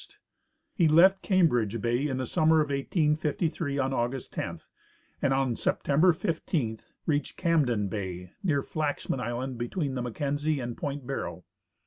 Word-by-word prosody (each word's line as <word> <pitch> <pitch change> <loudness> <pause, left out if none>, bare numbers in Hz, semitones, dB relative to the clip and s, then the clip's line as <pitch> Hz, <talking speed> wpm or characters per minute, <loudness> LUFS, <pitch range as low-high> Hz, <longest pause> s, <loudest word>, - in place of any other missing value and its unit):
He 170 -5 +3
left 185 +5 +6
Cambridge 120 - +2
bay 120 +6 0
in 130 -3 -2
the 130 - -2
summer 160 +4 +3
of 150 -1 +1
1853, 150 +1 0
on 135 -1 0
August 120 +1 -2
10, - - -4 0.6
and 140 - +2
on 135 -3 +1
September 155 +10 +3
15 155 - -2 0.3
reached 150 -2 -1
Camden 135 - +2
bay, 90 -3 -5
near 145 -7 +1
Flaxman 145 -3 -2
island, 125 +1 -3
between 135 +4 -2
the 130 - -2
Mackenzie 145 +4 -1
and 120 -2 -4
point 140 -2 -4
Barrow. 90 -10 -4
140 Hz, 140 wpm, -28 LUFS, 120-155 Hz, 0.6 s, left